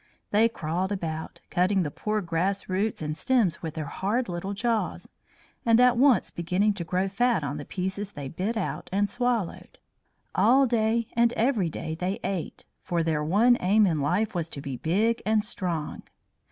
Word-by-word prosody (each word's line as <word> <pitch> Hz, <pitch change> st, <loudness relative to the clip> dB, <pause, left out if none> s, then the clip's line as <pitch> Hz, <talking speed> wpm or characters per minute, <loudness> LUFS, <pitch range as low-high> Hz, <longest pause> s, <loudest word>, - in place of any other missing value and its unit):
They 220 Hz, +3 st, +4 dB
crawled 180 Hz, -1 st, -2 dB
about, 160 Hz, -5 st, -4 dB
cutting 185 Hz, +1 st, +2 dB
the 150 Hz, -, -3 dB
poor 215 Hz, +6 st, -2 dB
grass 180 Hz, +3 st, -1 dB
roots 195 Hz, -1 st, -1 dB
and 150 Hz, 0 st, -3 dB
stems 220 Hz, -5 st, +1 dB
with 160 Hz, -2 st, -5 dB
their 155 Hz, -2 st, -3 dB
hard 210 Hz, -, -1 dB
little 185 Hz, +3 st, -4 dB
jaws, 230 Hz, +1 st, -1 dB, 0.6 s
and 230 Hz, 0 st, +4 dB
at 250 Hz, -1 st, +6 dB
once 255 Hz, 0 st, +4 dB
beginning 185 Hz, +5 st, +1 dB
to 185 Hz, -, -4 dB
grow 180 Hz, +4 st, 0 dB
fat 230 Hz, -2 st, +1 dB
on 140 Hz, +1 st, -3 dB
the 145 Hz, -, -7 dB
pieces 190 Hz, +2 st, -4 dB
they 145 Hz, -2 st, -6 dB
bit 190 Hz, -, -3 dB
out 215 Hz, -, -3 dB
and 200 Hz, +2 st, +2 dB
swallowed. 240 Hz, -2 st, -2 dB, 0.6 s
All 270 Hz, +3 st, +5 dB
day 230 Hz, -1 st, +1 dB
and 235 Hz, 0 st, +3 dB
every 225 Hz, -7 st, +1 dB
day 160 Hz, 0 st, -5 dB
they 180 Hz, +5 st, -2 dB
ate, 185 Hz, -5 st, -4 dB, 0.2 s
for 170 Hz, -1 st, -1 dB
their 155 Hz, -2 st, 0 dB
one 220 Hz, +10 st, +4 dB
aim 205 Hz, +4 st, +4 dB
in 160 Hz, -6 st, +1 dB
life 180 Hz, +10 st, 0 dB
was 170 Hz, -3 st, -2 dB
to 140 Hz, -, -7 dB
be 140 Hz, -2 st, -5 dB
big 200 Hz, -, +1 dB
and 215 Hz, -1 st, +2 dB
strong. 170 Hz, -8 st, -3 dB
195 Hz, 180 wpm, -27 LUFS, 165-225 Hz, 0.6 s, at